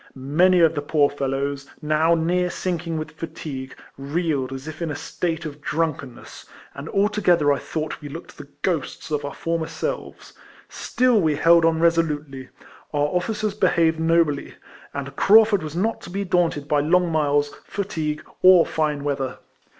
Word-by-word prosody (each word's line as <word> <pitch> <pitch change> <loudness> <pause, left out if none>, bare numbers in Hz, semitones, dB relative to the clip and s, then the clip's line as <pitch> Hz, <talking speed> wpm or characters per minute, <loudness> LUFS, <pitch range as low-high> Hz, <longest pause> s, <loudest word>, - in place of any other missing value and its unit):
Many 170 +7 +3
of 165 -1 +5
the 145 - -2
poor 145 -1 +2
fellows, 140 0 -3
now 155 +2 +2
near 175 +2 +1
sinking 170 -2 -3
with 155 - -5
fatigue, 155 -4 -7 0.2
reeled 140 -2 -1
as 135 +2 -7
if 155 +1 -8
in 165 - -2
a 145 - -3
state 165 +2 -3
of 150 -1 -7
drunkenness, 150 -6 -4 0.3
and 140 +3 -8
altogether 195 -7 +2
I 140 - -2
thouo 155 -1 -4
ht - - -8
we 145 - -8
looked 165 +5 -9
the 145 - -9 0.2
o 175 -4 +2
hosts 145 - -11
of 150 -1 -1
our 140 -1 -5
former 165 -1 -2
selves; - - -5 0.4
still 245 -4 +1
we 155 -3 +2
held 165 +2 +5
on 165 -1 +2
resolutely: 150 -5 0 0.4
our 145 0 +1
officers 210 +4 -1
behaved 170 -5 +2
nobly; 160 -3 +1 0.4
and 140 -1 -6
Craufurd 210 +1 +5
was 155 0 -6
not 220 +6 -1
to - - -10
be 200 +3 -3
daunted 170 -5 0
by 150 0 +2
long 170 +4 +2
miles, 145 -2 +1
fatigue, 160 -6 -3 0.2
or 185 -2 +7
fine 150 -2 -1
weather. 140 -2 -2
160 Hz, 165 wpm, -23 LUFS, 145-175 Hz, 0.4 s, or